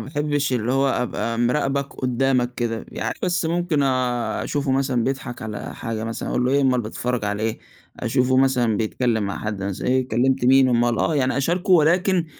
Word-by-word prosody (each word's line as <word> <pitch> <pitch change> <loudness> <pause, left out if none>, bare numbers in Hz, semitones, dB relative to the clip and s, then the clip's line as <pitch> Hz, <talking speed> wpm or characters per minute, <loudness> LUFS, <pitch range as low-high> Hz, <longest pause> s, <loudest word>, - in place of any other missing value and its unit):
باحبش 145 -1 -1
اللي 120 0 0
هو 135 +1 +2
أبقى 115 -2 -2
مراقبك 135 +3 0
قدّامك 125 -1 0
كده. 115 -2 -3
يعني - - -4
بس 180 -2 0
ممكن 170 -3 0
أشوفه 130 +2 -1
مثلًا 130 -3 +1
بيضحك 130 -3 -4
على 105 -2 -6
حاجة 115 -1 -4
مثلًا، 115 0 -4
أقول 125 - 0
له: 125 - +1
"إيه 140 +1 +3
أُمّال 130 -2 +2
بتتفرج 120 +1 -3
عليه 105 +1 -2
إيه؟" 110 - -2 0.4
أشوفه 130 +1 +1
مثلًا 125 -4 +2
بيتكلّم 110 +1 0
مع 100 - -3
حد 105 -2 -4
مث 100 -1 -4
"إيه 130 0 +1
كلمت 130 +3 +1
مين؟" 130 0 +5
أُمّال 120 -1 +2
آه، 160 - +1
يعني 130 -3 +1
أشاركه، 175 +7 -1
ولكن 175 +2 +3
130 Hz, 180 wpm, -22 LUFS, 120-140 Hz, 0.4 s, مين